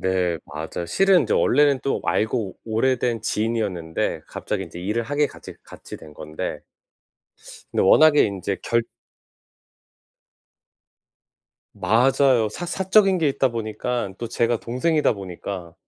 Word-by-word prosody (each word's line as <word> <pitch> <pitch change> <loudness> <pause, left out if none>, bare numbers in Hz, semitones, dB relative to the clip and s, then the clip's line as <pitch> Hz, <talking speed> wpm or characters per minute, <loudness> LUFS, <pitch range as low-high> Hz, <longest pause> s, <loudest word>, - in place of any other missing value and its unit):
네 90 -3 0
맞아요. 80 +2 -6
실은 195 - +3
저 - - +1
원래는 145 -1 +3
또 135 - -1
알고 110 -2 -1
오래된 115 0 0
지인이었는데 105 -8 -2
갑자기 100 -2 -4
인제 85 0 -11
일을 105 +5 -1
하게 145 +5 0
같이 - - -12
같이 - - -11
된 75 -2 -14
건데 75 0 -6 1.1
네 - - +1
워낙에 150 +9 +6
인제 100 -1 -3
결 115 0 +1 2.9
맞아요. 125 -1 +3
사 175 - -6
사적인 190 +1 +3
게 155 -3 +2
있다 135 -1 +1
보니깐 115 -2 -3
또 120 - -4
제가 115 0 0
동생이다 150 +6 +1
보니까 90 -3 -7
115 Hz, 255 characters per minute, -23 LUFS, 95-135 Hz, 2.9 s, 워낙에